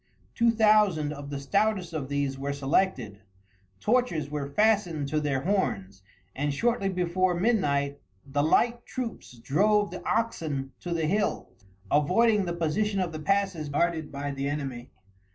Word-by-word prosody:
Two 235 -1 +3
thousand 210 -9 +3
of 140 -1 -8
the 140 -1 -4
stoutest 190 +3 0
of 140 -4 -4
these 140 -1 -1
were 140 +1 -3
selected, 135 - 0 0.6
torches 190 - 0
were 145 -2 -3
fastened 180 -4 +1
to 155 +1 +1
their 140 -3 -1
horns, 100 - -1 0.3
and 145 +1 -1
shortly 200 +6 0
before 180 0 +1
midnight 145 -9 +1 0.3
the 145 +1 -1
light 235 +10 +2
troops 230 - -6
drove 205 - +2
the - - -7
oxen 155 -12 -1
to 175 - -6
the 165 -2 0
hills, 200 - -2 0.3
avoiding 200 +8 +3
the 170 - -2
position 185 +5 0
of 180 -2 -1
the 155 - -6
passes 195 -3 0
guarded 160 +1 0
by 140 0 -4
the 140 0 -3
enemy. 135 -4 -4
160 Hz, 150 wpm, -27 LUFS, 140-205 Hz, 0.6 s, Two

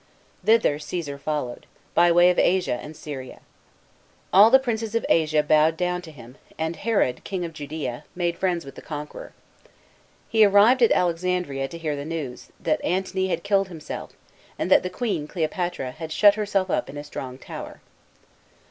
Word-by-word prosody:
Thither 215 -8 +3
Ctesar 150 -2 -5
followed, 145 -5 -4 0.3
by 175 0 +5
way 175 +1 +6
of 180 - 0
Asia 180 -9 +2
and 150 +1 -10
Syria. 135 -4 -8 0.9
All 205 +4 +8
the 265 - +8
princes 230 -4 -3
of 230 - 0
Asia 155 -2 +3
bowed 155 +2 +3
down 180 0 -1
to 165 -3 -11
him, 125 -2 -14 0.2
and 160 +1 -2
Herod, 200 - 0
King 185 -3 -3
of 165 - -7
Judea, 150 -3 -5
made 175 -1 -1
friends 175 -4 0
with 135 - -10
the - - -11
conqueror. 150 -1 -8 0.9
He 220 -1 +4
arrived 210 +5 +5
at 235 - +5
Alexandria, 175 -5 0
to 170 - -9
hear 155 -3 -2
the 140 - -5
news, 150 -5 -5
that 155 -2 -1
Antony 190 +1 -1
had 185 - -2
killed 200 -1 +2
himself, 160 -5 -8 0.4
and - - -2
that - - +7
the 180 - -4
queen, 185 -7 -2
Cleopatra, 175 -4 -2
had 155 +3 -8
shut 205 +5 +6
herself 200 -3 -1
up - - -1
in 140 - -8
a 145 - -5
strong 130 -3 -7
tower. - - -9
170 Hz, 175 wpm, -24 LUFS, 150-190 Hz, 0.9 s, All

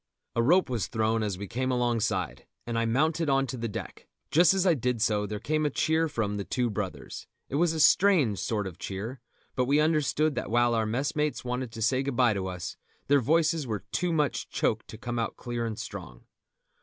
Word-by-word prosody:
A 115 - +3
rope 175 +10 +4
was 120 -5 -2
thrown 110 0 0
as 105 -4 -2
we 100 +1 -6
came 130 +6 -2
alongside, 115 - -1 0.2
and 120 - -3
I 115 0 +1
mounted 155 +7 +1
on 135 0 +3
to 130 - -5
the 115 -1 -3
deck; 105 - -7 0.2
just 165 +1 +6
as 190 -1 +1
I 180 - +5
did 125 -4 -1
so 105 -1 +1
there 105 0 -4
came 155 +6 0
a 150 - +2
cheer 160 +3 +1
from 110 -8 -2
The 100 - -2
Two 120 +2 -1
Brothers. 95 -10 -5 0.2
It 140 - -1
was 170 +1 +3
a 160 - -3
strange 155 - +4
sort 105 -3 -1
of 95 -4 -7
cheer, 110 +7 -5 0.4
but 125 - +1
we 140 +3 +3
understood 155 0 +2
that - - -4
while 120 +1 +3
our 110 -1 +1
messmates 145 +5 -1
wanted 125 -1 -3
to 115 - -4
say 130 +4 +2
good 135 -2 -3
bye 120 -3 +4
to 95 -2 -3
us, 90 -1 -5 0.3
their 145 -1 +5
voices 155 +1 +2
were 105 -3 -3
too 180 -1 0
much 150 -4 0
choked 110 0 -1
to 110 - -9
come 120 +1 -4
out 115 - -2
clear 120 -1 -3
and 110 -2 -5
strong. - - -8
120 Hz, 220 wpm, -28 LUFS, 110-150 Hz, 0.4 s, just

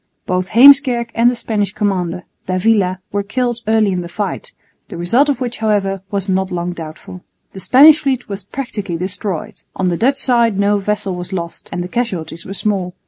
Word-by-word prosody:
Both 185 0 -1
Heemskerk 245 0 +6
and 235 +1 +4
the 250 - -2
Spanish 210 -4 -2
commander, 180 -4 -2 0.2
d'Avila, 185 0 +1
were 205 - 0
killed 240 +3 -2
early 220 -2 +3
in 180 -1 -1
the 170 - -8
fight, 210 - -4 0.4
the 175 - -8
result 235 +13 +2
of 275 -4 0
which 245 -2 -4
however 200 -3 0
was 200 -1 -2
not 190 0 0
long 175 0 -3
doubtful. 165 +2 -9 0.3
The 190 - -8
Spanish 295 +9 +7
fleet 265 -4 -2
was 200 -1 -6
practically 205 -6 -5
destroyed. 185 -1 -4
On 185 -1 0
the 170 - -1
Dutch 270 +7 +2
side 235 -6 +2
no 200 +1 +2
vessel 200 -1 -2
was 180 +1 -6
lost 170 -2 -6
and 175 0 -3
the - - -5
casualties 180 -8 -4
were 195 - -5
small. 190 -4 -2
200 Hz, 190 wpm, -17 LUFS, 180-235 Hz, 0.4 s, Spanish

